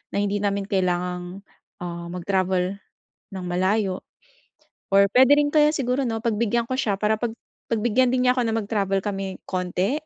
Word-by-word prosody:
na - - +1
hindi 205 0 -1
namin 200 -1 0
kailangang, 180 -1 -2 0.4
ah, 170 -1 -5
mag-travel 185 +1 -1 0.5
ng 190 -1 -5
malayo 190 +1 +1 0.9
or 200 0 +6
puwede 260 +4 +6
rin 290 0 +2
kaya 300 -1 +6
siguro 255 0 0
'no, 225 -1 -2
pagbigyan 230 +1 +1
ko 255 - -3
siya 215 -7 0
para 215 +1 +2
pag 240 - -1 0.4
pagbigyan 240 +2 +2
din 255 0 +1
niya 250 - +5
'ko 250 - +1
na 230 - 0
mag-travel 200 -3 0
kami 195 -2 -4
konti 185 - -1
200 Hz, 160 wpm, -24 LUFS, 185-240 Hz, 0.9 s, or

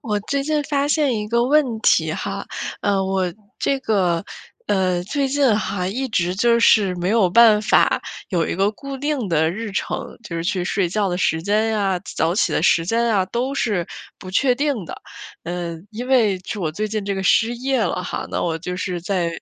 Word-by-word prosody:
我 210 -2 -1
最 275 +7 -2
近 300 0 0
发 285 -1 0
现 290 -5 +2
一 210 0 -4
个 235 +1 +2
问 265 -4 +2
题 160 -7 +3
哈， 195 +3 -4 0.3
呃， 195 -2 +1
我 190 -2 -1 0.3
这 275 - 0
个 185 -7 +1 0.4
呃， 185 -3 +1
最 275 +7 -1
近 265 -5 +3
还 200 -3 -2
一 260 +7 -3
直 180 -5 0
就 235 +4 +3
是 200 -5 +4
没 175 +1 -2
有 205 -5 +3
办 220 0 +6
法 - - +3 0.3
有 175 -4 +1
一 - - -2
个 195 +2 +2
固 275 +5 -7
定 275 -6 -2
的 160 -1 +2
日 220 +4 -5
程， - - -4
就 175 - -7
是 165 - -2
去 180 0 -1
睡 190 0 0
觉 200 +2 0
的 180 - -1
时 160 -3 +1
间 210 +4 +1
呀、 200 -4 0 0.2
早 165 +2 +1
起 205 - +1
的 - - +1
时 165 - +3
间 230 +6 +1
呀， 205 -5 +2
都 245 +7 -2
是 205 -10 0 0.3
不 185 - -10
确 255 +7 +3
定 275 -6 -1
的。 - - -9 0.4
嗯， 170 0 -5
因 245 +4 -6
为 230 -7 +3
就 205 +3 -6
我 160 -4 -2
最 215 +6 -3
近 215 -1 -3
这 200 0 -2
个 190 - -3
失 225 +4 +3
业 260 +1 -1
了 180 -3 -1
哈， 180 - -4
那 - - -2
我 165 -1 -1
就 180 +2 -5
是 180 -1 -3
在， 180 -1 -1
205 Hz, 225 characters per minute, -21 LUFS, 180-235 Hz, 0.4 s, 办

